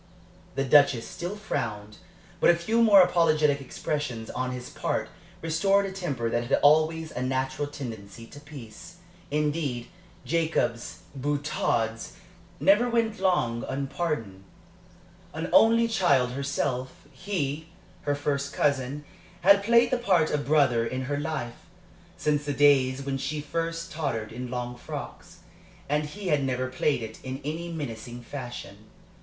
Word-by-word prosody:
The 135 - +1
Duchess 140 -3 +4
still 175 +4 -5
frowned, 105 - -4 0.4
but - - +5
a 170 - +7
few 220 +7 +1
more 205 -4 +8
apologetic 155 -5 +3
expressions 130 -4 -4
on 130 0 -2
his 125 -1 -6
part - - -2 0.3
restored 195 +5 +2
a 195 - -4
temper 150 -12 -3
that 120 +1 -1
had - - +3
always 155 +2 +4
a 125 - -4
natural 130 +2 -1
tendency 115 -6 -8
to 145 - -12
peace. 145 +1 -11 0.3
Indeed, 150 -5 -1 0.4
Jacob's 155 -6 -1
boutades 135 -5 -1 0.5
never 210 +5 +4
went 230 -3 0
long 175 -12 +1
unpardoned. 135 - -3 0.9
An 160 +2 -4
only 230 +1 +6
child 145 - +2
herself, 140 -1 -3
he, 155 -1 -3 0.3
her 145 -1 0
first 140 -1 -2
cousin, 140 0 0 0.4
had 200 +2 +6
played 235 +3 +4
the 255 - +1
part 185 -9 +2
of 145 -1 -1
brother 140 -6 +4
in 130 +3 -3
her 145 +2 -2
life, 145 -6 -5 0.5
since 150 -1 0
the 145 -1 -2
days 135 -1 +4
when 135 -1 -2
she 140 +3 -3
first 165 +2 -3
tottered 125 -9 -3
in 125 +2 -6
long 125 0 -4
frocks, - - -8 0.5
and 150 +1 0
he 190 +5 -6
had 145 -3 +2
never 130 -1 -1
played 130 -1 0
it 110 0 -8
in 130 +1 -5
any 165 +3 -4
mincing 120 -5 -6
fashion. 120 -6 -8
145 Hz, 140 wpm, -27 LUFS, 125-165 Hz, 0.9 s, more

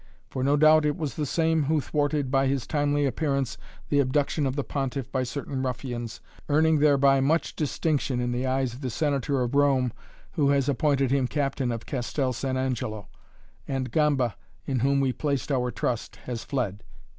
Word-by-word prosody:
For, 130 - -2
no 140 +2 +3
doubt 155 +1 +6
it 150 +2 0
was 155 -5 -3
the 150 -2 -2
same 160 0 +1
who 155 +2 +2
thwarted 145 0 -1
by 135 0 +3
his 135 -2 0
timely 145 -1 +1
appearance 140 -2 -1 0.3
the 145 - +3
abduction 140 +2 +1
of 130 - -2
the 145 - -1
Pontiff 135 -2 -3
by 130 - 0
certain 135 +1 -4
ruffians, 120 -2 -4 0.3
earning 155 +1 +4
thereby 140 -2 +4
much 155 +5 +1
distinction 145 -3 0
in 120 0 -1
the 125 +2 -1
eyes 130 -2 0
of 125 - -10
the 130 - -2
Senator 140 0 0
of 120 +2 -3
Rome 135 -4 +3 0.4
who 150 -6 +2
has 140 -1 +2
appointed 140 -1 +2
him 135 -2 +2
captain 135 -3 -1
of 115 -1 -5
Castel 130 0 -2
San 130 +2 -2
Angelo 115 -6 -3 0.6
and 130 -3 -2
Gamba 140 -6 +2 0.3
in 130 -2 -1
whom 140 +3 +2
we 130 -2 +1
placed 145 0 -2
our 125 -2 +1
trust 120 -1 -3
has 120 -2 -4
fled. 110 -8 -2
135 Hz, 180 wpm, -26 LUFS, 130-145 Hz, 0.6 s, doubt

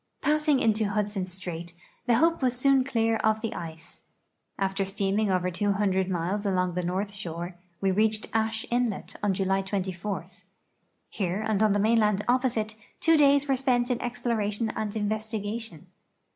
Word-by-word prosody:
Passing 300 -2 +3
into 220 -2 +2
Hudson 205 -2 -1
strait, 175 -2 -5 0.3
the 240 - +5
Hope 330 +6 +3
was 250 -1 +1
soon 270 0 +4
clear 225 -4 +1
of 220 0 +1
the 225 - -3
ice. 165 0 -8 0.6
After 195 0 0
steaming 195 +2 0
over 180 -1 +1
200 195 0 +1
miles 185 +3 -1
along 185 -3 0
the 180 +1 -2
north 190 +4 -2
shore, 175 -3 -6 0.3
we 195 -1 +2
reached 215 +2 +2
Ashe 220 0 0
inlet 240 -5 -1
on 200 -2 +1
July 195 0 +1
24. 190 -1 -3 0.8
Here 195 +1 -2
and 215 -2 +1
on 215 -2 +4
the - - +2
mainland 210 -1 +3
opposite 240 -3 +1 0.2
two 325 0 +4
days 285 -1 +5
were 270 - +3
spent 250 -1 +1
in 245 - -1
exploration 230 -3 -1
and 215 0 -3
investigation. 215 -3 -3
210 Hz, 155 wpm, -27 LUFS, 190-230 Hz, 0.8 s, the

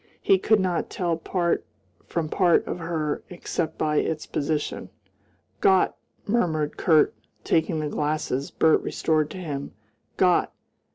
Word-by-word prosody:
He 390 -1 +3
could 220 -1 +3
not 185 -3 -1
tell 175 -3 -1
part 170 +1 -1 0.4
from 165 -2 -2
part 175 +1 +3
of - - -4
her, 160 -3 -2
except 170 -2 -3
by 150 -1 0
its 155 0 -1
position. 150 +1 -2 0.7
"Gott!" 190 -1 +4 0.3
murmured 160 -9 0
Kurt, 160 -4 +4 0.3
taking 160 0 +1
the 150 - -2
glasses 145 -2 -2
Bert 160 -1 +3
restored 155 -2 0
to - - -8
him 145 -6 -5 0.4
"Gott! 180 -1 +3
160 Hz, 130 wpm, -25 LUFS, 155-180 Hz, 0.7 s, Gott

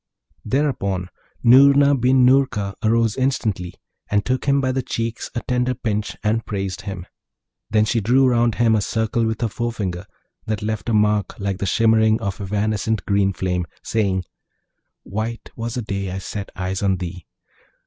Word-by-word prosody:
Thereupon, 100 -8 -1 0.3
Noorna 140 +3 +7
bin 130 0 +4
Noorka 125 -7 +2
arose 115 0 +2
instantly, 110 -9 -1 0.3
and 100 -1 +1
took 130 0 -1
him 140 0 +3
by 130 -1 +1
the 130 +1 -1
cheeks 115 -2 -4
a 120 - -1
tender 125 0 0
pinch, 105 -3 -3
and 110 +2 +1
praised 95 -2 -4
him. 95 -3 -6 0.6
Then 110 0 +3
drew 120 +4 +3
she - - +5
round 120 -2 +2
him 115 -2 +3
a 110 - +2
circle 110 +3 0
with 110 0 -3
her 115 - +2
forefinger 105 -5 -4 0.4
that 110 -1 -2
left 110 0 -3
a - - +1
mark 105 -2 +1
like 100 -1 -2
the 100 - -2
shimmering 110 +1 +3
of 100 -3 -4
evanescent 105 +2 -1
green 100 -1 +2
flame, 90 -2 -2 0.2
saying, 100 -4 0 0.8
'White 110 +3 -5
was 115 0 -4
the 125 - -2
day 100 -2 -3
I 95 - -4
set 100 +1 -6
eyes 95 0 -3
on 95 -2 +2
thee!' 90 -1 -7
110 Hz, 165 wpm, -21 LUFS, 100-120 Hz, 0.8 s, Noorna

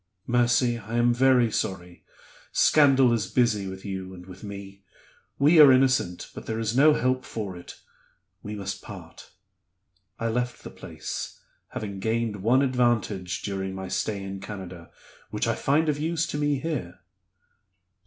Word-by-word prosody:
'Mercy, 120 0 +2
I 115 +1 -6
am 120 0 +4
very 125 -2 +4
sorry; 90 -3 -4 0.5
scandal 135 -5 +5
is 105 -5 -1
busy 110 -6 +1
with 95 +1 -8
you 95 -1 -5
and 90 0 -12
with 95 +1 -12
me; 100 -1 -9 0.6
we 155 +4 +5
are 145 -3 +10
innocent, 130 -9 +2
but - - -10
there 110 - -2
is 115 0 -2
no 150 +3 +6
help 130 -1 0
for 100 -5 -5
it 85 - -11 0.6
we 105 +1 -6
must 95 -1 -5
part.' - - -11 0.9
I 115 - -1
left 125 +2 -2
the - - -8
place; - - -7 0.3
having 100 -3 -6
gained 110 0 -1
one 120 +7 +3
advantage 120 -8 0
during 95 -1 -3
my 95 0 -6
stay 100 -3 -2
in 95 0 -6
Canada, 95 -4 -8 0.4
which - - -2
I - - +2
find 155 +4 +1
of 150 -1 0
use 165 +1 0
to - - -3
me 145 -1 +1
here." 135 - -4
115 Hz, 155 wpm, -26 LUFS, 95-130 Hz, 0.9 s, are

